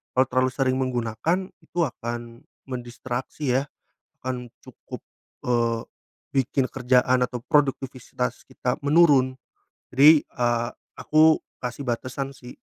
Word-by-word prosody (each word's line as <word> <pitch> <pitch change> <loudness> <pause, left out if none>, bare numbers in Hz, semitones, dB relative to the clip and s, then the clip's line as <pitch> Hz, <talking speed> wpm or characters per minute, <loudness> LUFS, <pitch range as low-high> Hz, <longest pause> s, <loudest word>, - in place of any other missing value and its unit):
kalau 130 +1 +5
terlalu 130 0 +2
sering 130 -1 +1
menggunakan, 130 - -1
itu 175 - -7
akan 120 -2 -5 0.3
mendistraksi 125 +2 -4
ya. - - -2 0.6
Akan 125 -1 -3 0.2
cukup, - - -11 0.4
eee, 115 -2 +1 0.5
bikin 135 0 +1
kerjaan 125 0 +3
atau 125 - -6
produktivitas 130 -4 0
kita 125 +1 -2
menurun 140 -4 +4 0.6
jadi, 150 +4 +8
eee, 120 -1 -1 0.3
aku 155 +1 +5 0.2
kasih 125 +3 -4
batasan 130 +2 -3
sih. 125 0 -12
130 Hz, 110 wpm, -25 LUFS, 120-135 Hz, 0.6 s, jadi